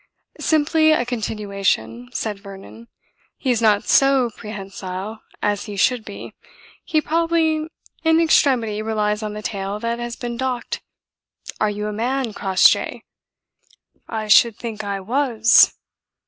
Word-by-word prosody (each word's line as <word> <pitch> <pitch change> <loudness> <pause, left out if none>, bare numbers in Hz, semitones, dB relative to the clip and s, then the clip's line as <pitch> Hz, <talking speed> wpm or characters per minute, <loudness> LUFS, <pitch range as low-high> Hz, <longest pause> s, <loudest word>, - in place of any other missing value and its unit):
"Simply 315 0 +3
a 245 -5 +1
continuation," 200 - -2
said 210 - -3
Vernon. 200 +3 -12 0.5
"He 260 - -1
is 235 -2 +1
not 210 -2 +3
so 270 -3 +3
prehensile 195 0 -7 0.2
as 205 -1 0
he 205 - -7
should 245 +3 +2
be. - - -9 0.5
He 310 - +1
probably 320 -1 +1 0.4
in 320 0 +4
extremity 250 -10 +2
relies 210 -1 -1
on 210 -1 -4
the 210 0 -7
tail 200 0 -4
that 235 0 -2
has 240 -1 -4
been 240 -1 -5
docked. 255 -2 -3 0.8
Are 215 - +2
you 210 0 -4
a 210 - -3
man, 245 +1 -2
Crossjay?" 190 -2 +2 1.1
"I 220 -1 -3
should 220 +1 +5
think 220 -2 -6
I 200 -1 -3
was!" 235 +1 +4
220 Hz, 135 wpm, -21 LUFS, 205-255 Hz, 1.1 s, should